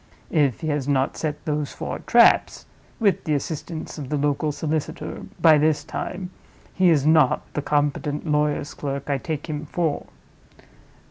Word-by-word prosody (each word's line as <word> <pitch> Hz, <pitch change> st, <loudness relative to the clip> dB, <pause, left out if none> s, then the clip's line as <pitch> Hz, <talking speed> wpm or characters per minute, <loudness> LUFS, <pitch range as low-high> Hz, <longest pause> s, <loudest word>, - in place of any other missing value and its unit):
If 145 Hz, -7 st, +2 dB
he 155 Hz, -, -2 dB
has 145 Hz, -2 st, -1 dB
not 135 Hz, -1 st, +1 dB
set 150 Hz, -2 st, -4 dB
those 150 Hz, -2 st, -2 dB
four -, -, -5 dB
traps -, -, +4 dB, 0.3 s
(with 205 Hz, -4 st, +2 dB
the 155 Hz, -, +1 dB
assistance 155 Hz, +2 st, -5 dB
of 135 Hz, -3 st, -6 dB
the 150 Hz, -, 0 dB
local 145 Hz, +1 st, 0 dB
solicitor) 155 Hz, +2 st, -4 dB
by 160 Hz, -3 st, +6 dB
this 150 Hz, -1 st, +2 dB
time, 180 Hz, +4 st, -5 dB, 0.4 s
he 185 Hz, -1 st, +4 dB
is 150 Hz, -4 st, +3 dB
not 155 Hz, -4 st, +4 dB
the 150 Hz, -, -1 dB
competent 145 Hz, +1 st, -1 dB
lawyer's 150 Hz, -1 st, 0 dB
clerk 140 Hz, 0 st, -4 dB
I 140 Hz, -, 0 dB
take 155 Hz, 0 st, -4 dB
him 150 Hz, -1 st, -4 dB
for. 160 Hz, -2 st, -1 dB
150 Hz, 155 wpm, -23 LUFS, 145-160 Hz, 0.4 s, by